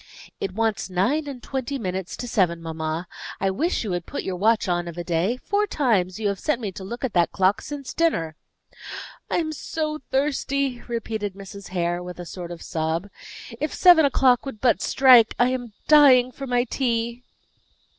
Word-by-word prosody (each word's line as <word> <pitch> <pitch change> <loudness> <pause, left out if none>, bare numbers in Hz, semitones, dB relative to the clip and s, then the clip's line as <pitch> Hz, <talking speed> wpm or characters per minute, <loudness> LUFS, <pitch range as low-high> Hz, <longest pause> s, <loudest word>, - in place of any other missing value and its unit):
"It 190 -1 -4
wants 225 -3 -1
nine 235 - 0
and 265 -4 -7
twenty 270 +1 -3
minutes 190 -5 -4
to 245 - -5
seven, 180 -7 +1
mamma. 160 +1 -4 0.3
I 195 0 +1
wish 315 - -1
you 210 - -3
would 175 -1 -3
put - - -4
your 190 - -3
watch 220 +3 +2
on 175 -1 0
of 170 0 -8
a 175 - -3
day; 175 +8 0
four 410 +9 0
times 215 - 0
you 215 - 0
have 200 - -3
sent 300 -6 0
me 210 -5 -4
to 190 - -9
look 235 +7 -4
at 245 - -4
that 175 -2 +2
clock 190 +1 +2
since 285 -3 -7
dinner." 165 - 0 0.9
"I - - 0
am 320 -2 -1
so 310 0 -3
thirsty!" 275 -2 0
repeated 220 -4 -3
Mrs. 200 0 -10
Hare, 175 -1 -1
with 180 0 -8
a 175 - -6
sort 175 0 -7
of 175 -1 -8
sob. 165 +3 -2 0.5
"If 305 +1 -2
seven 350 -3 +7
o'clock 260 -3 +3
would 270 -6 -7
but 245 0 +2
strike! 250 -4 +6
I 245 +1 +4
am 250 -3 -3 0.2
dying 265 -5 +7
for 275 +2 -7
my 245 -1 +2
tea." 235 -1 -2
225 Hz, 190 wpm, -24 LUFS, 180-265 Hz, 0.9 s, seven